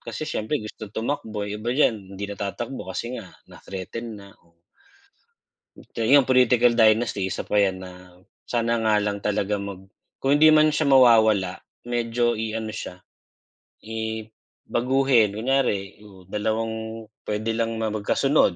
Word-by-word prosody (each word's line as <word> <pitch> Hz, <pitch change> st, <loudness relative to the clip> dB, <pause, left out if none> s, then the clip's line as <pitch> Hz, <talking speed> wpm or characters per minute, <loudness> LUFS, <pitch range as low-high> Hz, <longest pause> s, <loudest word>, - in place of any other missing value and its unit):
kasi 155 Hz, -, -6 dB
siyempre 110 Hz, +2 st, -2 dB
gusto 110 Hz, 0 st, -8 dB
tumakbo. 110 Hz, -2 st, -3 dB
Iba 105 Hz, +4 st, -3 dB
diyan 105 Hz, -9 st, +1 dB
hindi 100 Hz, -, -4 dB
na 100 Hz, -, -6 dB
tatakbo 110 Hz, +3 st, -5 dB
kasi 120 Hz, +6 st, -4 dB
nga -, -, -9 dB, 0.2 s
na-threaten 110 Hz, +4 st, -7 dB
na, 100 Hz, -1 st, -12 dB
oh. 85 Hz, 0 st, -32 dB, 1.4 s
So, 115 Hz, -, -1 dB
yung 135 Hz, +2 st, +5 dB
political 125 Hz, -2 st, +4 dB
dynasty, 110 Hz, -3 st, +3 dB
isa -, -, -4 dB
pa 105 Hz, -, 0 dB
'yan 95 Hz, -2 st, +3 dB
na 90 Hz, -1 st, -13 dB, 0.2 s
sana 115 Hz, 0 st, 0 dB
nga 110 Hz, -1 st, +2 dB
lang 105 Hz, 0 st, -2 dB
talaga 105 Hz, 0 st, 0 dB
mag 100 Hz, -1 st, -7 dB, 0.3 s
kung 140 Hz, +2 st, +3 dB
hindi 155 Hz, +1 st, +7 dB
man 155 Hz, 0 st, +6 dB
siya 155 Hz, -, +1 dB
mawawala, 110 Hz, -7 st, +5 dB, 0.3 s
medyo 120 Hz, 0 st, 0 dB
i-ano 110 Hz, 0 st, -3 dB
siya, 90 Hz, -3 st, -7 dB, 0.9 s
i 110 Hz, 0 st, -4 dB, 0.5 s
baguhin. 125 Hz, -4 st, +3 dB
Kunyari, 110 Hz, -5 st, 0 dB
oh, 95 Hz, -3 st, -15 dB
dalawang 110 Hz, +1 st, -3 dB, 0.2 s
puwede 110 Hz, +2 st, -1 dB
lang 115 Hz, 0 st, -1 dB
ma 110 Hz, -1 st, -1 dB
magkasunod, 110 Hz, -, +2 dB
110 Hz, 140 wpm, -24 LUFS, 100-120 Hz, 1.4 s, hindi